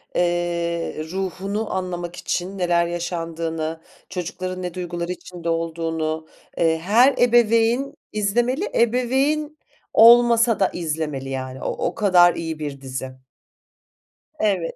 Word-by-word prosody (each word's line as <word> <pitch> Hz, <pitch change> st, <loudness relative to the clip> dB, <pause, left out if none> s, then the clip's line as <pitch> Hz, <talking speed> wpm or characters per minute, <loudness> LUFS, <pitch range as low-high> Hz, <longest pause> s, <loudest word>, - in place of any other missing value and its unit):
eee, 170 Hz, -2 st, -1 dB
ruhunu 195 Hz, +3 st, -3 dB
anlamak 175 Hz, -2 st, -4 dB
için 185 Hz, +2 st, -3 dB
neler 175 Hz, -2 st, +2 dB
yaşandığını, 165 Hz, -2 st, -3 dB, 0.3 s
çocukların 185 Hz, +1 st, -5 dB
ne 180 Hz, -1 st, -4 dB
duygular 175 Hz, -1 st, -4 dB
içinde 175 Hz, -2 st, -6 dB
olduğunu, 160 Hz, -1 st, -2 dB, 0.3 s
eee, 160 Hz, -1 st, +2 dB
her 230 Hz, +10 st, +4 dB
ebeveyn 240 Hz, +2 st, +3 dB, 0.2 s
izlemeli. 240 Hz, -, 0 dB
Ebeveyn 265 Hz, +6 st, +1 dB, 0.4 s
olmasa 235 Hz, 0 st, +6 dB
da 190 Hz, -, +3 dB
izlemeli, 150 Hz, -5 st, -3 dB
yani, 130 Hz, -1 st, -5 dB
o -, -, -1 dB, 0.2 s
o -, -, -4 dB
kadar 180 Hz, -4 st, +5 dB
iyi 160 Hz, -1 st, -4 dB
bir 145 Hz, -3 st, -5 dB
dizi. 130 Hz, -1 st, -5 dB, 1.3 s
Evet. 190 Hz, -6 st, 0 dB
175 Hz, 110 wpm, -22 LUFS, 165-220 Hz, 1.3 s, olmasa